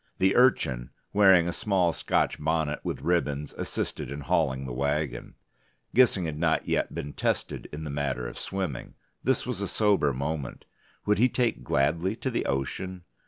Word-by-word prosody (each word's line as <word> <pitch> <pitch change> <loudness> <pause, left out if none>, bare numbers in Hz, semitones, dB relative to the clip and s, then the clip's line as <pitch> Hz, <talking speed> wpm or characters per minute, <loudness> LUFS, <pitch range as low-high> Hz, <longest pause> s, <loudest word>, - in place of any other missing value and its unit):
The 95 +1 +3
Urchin, 65 - +3 0.2
wearing 95 -4 +6
a 85 - -1
small 90 -5 +1
Scotch - - 0
bonnet 80 -1 0
with - - -4
ribbons, 75 -5 0
assisted 65 - -4
in 70 +1 -5
hauling 65 -1 0
the 65 - -5
wagon. 70 -1 -2 0.6
Gissing 115 -7 +4
had 75 -2 -4
not 80 -2 +1
yet - - 0
been 70 0 -5
tested - - -2
in 75 +2 -6
the 75 - -4
matter 70 -4 -2
of - - -7
swimming: 95 -10 -4 0.3
this - - +1
was - - -3
a - - -1
sober 100 -9 +2
moment. 70 +1 -4 0.4
Would 105 0 +2
he 125 +2 +5
take 120 -1 0
gladly 85 +8 +1
to 130 +2 -3
the 120 - -1
ocean? 90 +7 -3
80 Hz, 165 wpm, -27 LUFS, 70-95 Hz, 0.6 s, wearing